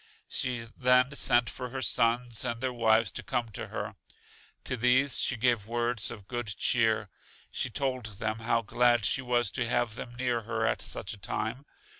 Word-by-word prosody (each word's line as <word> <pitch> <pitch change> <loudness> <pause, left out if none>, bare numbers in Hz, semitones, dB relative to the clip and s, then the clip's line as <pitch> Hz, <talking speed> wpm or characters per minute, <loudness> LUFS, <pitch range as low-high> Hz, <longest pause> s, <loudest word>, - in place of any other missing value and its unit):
She 120 -2 -2
then 125 +1 +4
sent 120 -3 +3
for 125 -1 -5
her 130 +1 -4
sons 115 +1 +2
and 120 -2 -2
their 130 0 -2
wives 110 -2 +3
to - - -4
come 120 -1 -2
to 105 - -6
her. - - -5 0.7
To 130 - -2
these 130 +3 +3
she 125 - +2
gave 115 -3 +2
words 120 -1 0
of 100 -4 -10
good 120 -2 -3
cheer. 110 -3 +2 0.4
She 130 - 0
told 130 -2 -2
them 110 0 -2
how 115 +1 +1
glad 120 0 +3
she 130 - +2
was 120 -4 +1
to 125 -3 -1
have 120 -3 +1
them 120 +2 -8
near 120 -1 0
her 105 - -2
at - - 0
such - - -3
a - - -8
time. 115 +7 -3
120 Hz, 185 wpm, -29 LUFS, 115-125 Hz, 0.7 s, then